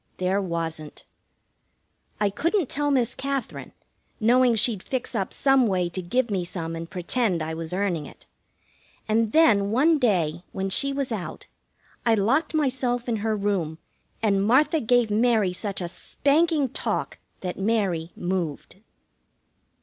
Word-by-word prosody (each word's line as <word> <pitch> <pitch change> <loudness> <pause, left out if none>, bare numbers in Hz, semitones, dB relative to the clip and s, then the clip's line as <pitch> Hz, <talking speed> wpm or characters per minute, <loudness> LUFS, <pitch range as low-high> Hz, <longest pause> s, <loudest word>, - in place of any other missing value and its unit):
There 185 +2 +1
wasn't. 165 -4 -5 1.1
I 205 -1 +2
couldn't 335 - 0
tell 290 0 0
Miss 255 -5 +1
Katherine, 275 -1 -4 0.5
knowing 245 +2 +4
she'd 220 -3 +1
fix 260 +3 -3
up 195 -5 -2
some 270 -3 +3
way 180 -3 0
to 185 +2 -4
give 235 +6 0
me 190 -3 0
some 165 -2 -5
and 165 0 -6
pretend 185 -1 -1
I 160 +1 -4
was 160 0 -5
earning 180 -5 -1
it; - - -16 0.8
and 220 0 +1
then, 215 -11 +4
one 295 +8 +3
day, 175 - +1
when 195 0 -3
she 275 +7 +2
was 275 -2 -2
out, 205 -6 -5 0.6
I 230 -1 +4
locked 250 +11 +1
myself 255 -4 0
in 230 -2 0
her 215 +1 -1
room, 195 -6 -1 0.5
and 200 -3 +2
Martha 275 +9 +3
gave 240 -3 +2
Mary 215 -4 +2
such 195 +1 -4
a 175 - -2
spanking 290 - +1
talk - - -3 0.2
that 180 0 -4
Mary 195 -6 0
moved. 175 -3 -3
215 Hz, 145 wpm, -25 LUFS, 180-255 Hz, 1.1 s, knowing